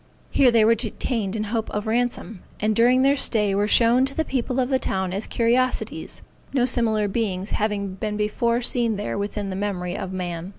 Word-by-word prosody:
Here 265 -3 +5
they 230 -2 +4
were 230 - +6
detained 225 -2 -3
in 215 - -1
hope 220 +1 -2
of 210 +1 -3
ransome, 225 -3 -1 0.2
and 215 0 +1
during 250 +3 +4
their 275 +1 +4
stay 210 -7 0
were 205 +1 +1
shown 235 +3 +4
to 270 - -6
the 320 - 0
people 255 -1 -1
of 250 0 +1
the 265 -1 +2
town 190 -5 -2
as 200 +3 -3
curiosities, 245 +2 0 0.3
no 255 -3 +3
similar 225 -4 +1
beings 200 -2 -2
having 205 -2 -1
been 210 +2 -4
before 235 +3 0
seen 235 -2 +2
there 205 +1 -3
within 200 0 -3
the - - -4
memory 190 -3 -3
of 190 - -5
man. 175 -1 -4
220 Hz, 200 wpm, -23 LUFS, 200-245 Hz, 0.3 s, were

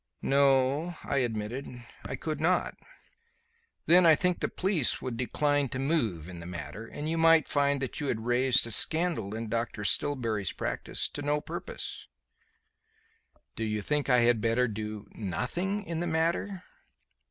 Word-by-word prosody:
"No," 140 +4 +3
I - - -1
admitted, 120 +2 -3 0.2
"I - - -4
could 155 -1 -4
not." 175 +2 +2 1.1
"Then 180 +2 +6
I 165 -2 +7
think 180 +2 0
the - - -1
police 185 -8 0
would 130 -2 -4
decline 145 +4 0
to 130 - -4
move 120 - 0
in 90 -2 -8
the 85 - -8
matter, 90 +5 -7
and 150 +5 -6
you 165 +1 -1
might 165 -1 +5
find 140 -1 +1
that 135 - -3
you 145 - -2
had 110 -3 -2
raised 125 +1 +3
a 115 - -5
scandal 155 - +2
in 115 0 -4
Dr. 115 -1 -3
Stillbury's 115 - 0
practice - - -3
to 145 - -6
no 145 +1 +1
purpose." - - -6 1.5
"So - - -7
you 105 -2 -1
think 150 -2 -1
I 125 -1 +5
had 120 -2 +3
better 115 +3 +2
do 105 -1 -5
nothing 175 - -2
in 170 -4 -4
the 175 - -1
matter?" 170 +4 -1
135 Hz, 160 wpm, -29 LUFS, 115-160 Hz, 1.5 s, I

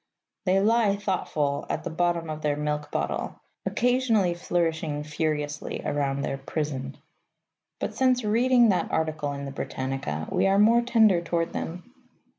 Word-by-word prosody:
They 190 +1 +4
lie, 215 -1 +3
thoughtful, 160 -8 -1
at - - -2
the - - -4
bottom 170 0 0
of 155 0 -6
their 150 -1 +1
milk 150 0 -2
bottle, - - -3 0.3
occasionally 240 -7 +2
flourishing 165 -3 -1
furiously 150 -1 -2
round 140 -1 -1
their 135 - -3
prison. 135 -2 -4 0.8
But, - - -3
since 255 -2 +2
reading 240 +2 +4
that 185 - +1
article 155 -2 -1
in 140 0 -5
the 140 - -5
Britannica, 130 - -4
we - - +2
are 195 0 +3
more 225 +3 +5
tender 220 -7 +4
toward 170 0 -1
them. 180 +9 -6
165 Hz, 145 wpm, -26 LUFS, 145-210 Hz, 0.8 s, more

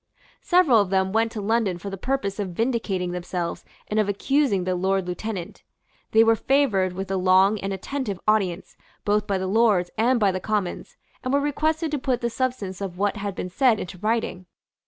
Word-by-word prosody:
Several 325 - +4
of 200 - -2
them 190 0 +1
went 225 0 +2
to 215 - -4
London 210 -3 +1
for 200 +3 -7
the - - -4
purpose 215 -2 -2
of 190 -3 -3
vindicating 220 -7 -1
themselves 175 -1 -4 0.2
and 215 - 0
of 210 -1 +1
accusing 225 -1 +1
the 185 0 -1
Lord 190 +1 0
Lieutenant. 180 0 -5 0.5
They 220 +1 +5
were 225 0 +4
favoured 220 -8 +2
with 190 +1 -5
a 195 - +1
long 190 +3 +4
and 195 0 -3
attentive 200 0 -4
audience, 195 -4 0 0.3
both 210 0 +1
by 200 -2 0
the 190 - -3
Lords 200 -3 +2
and 240 +2 +3
by 205 -3 +3
the 185 - -3
Commons, 205 -2 -3 0.3
and 255 - -2
were 280 - +3
requested 310 +2 0
to 295 - -1
put 255 -2 -1
the 235 -1 -1
substance 220 -8 -3
of 185 -3 -5
what 205 +2 0
had 200 -1 -4
been 180 - -5
said 240 0 +3
into 185 0 -7
writing. 215 -3 -1
205 Hz, 200 wpm, -24 LUFS, 185-235 Hz, 0.5 s, They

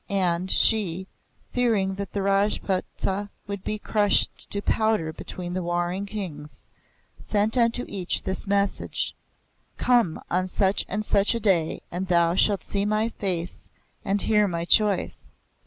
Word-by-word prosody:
And, 185 -2 0
she, 190 -5 +3 0.5
fearing 220 -6 +1
that 200 +1 -5
the 200 - -2
Rajputs 195 -1 0 0.4
would 200 -2 -6
be 215 - -2
crushed 210 -1 0
to 200 - -3
powder 215 -6 +1
between 175 +2 -7
the 185 - -1
warring 175 +3 -1
Kings, 160 -8 -7 0.6
sent 210 +2 +1
unto 240 0 +2
each 185 -3 -2
this 190 +1 -4
message: 200 0 0 0.6
'Come 240 -10 +2
on 185 +1 +1
such 190 +1 0
and 210 +2 -2
such 205 +2 +3
a - - -1
day, 185 -7 +1
and 185 +2 -3
thou 170 -1 +3
shalt 200 +2 +2
see 200 -1 -2
my 215 +2 +1
face 180 -5 -3 0.3
and 200 +1 +1
hear 210 -1 +3
my 170 -2 -2
choice. 210 +1 +1
195 Hz, 140 wpm, -25 LUFS, 180-210 Hz, 0.6 s, she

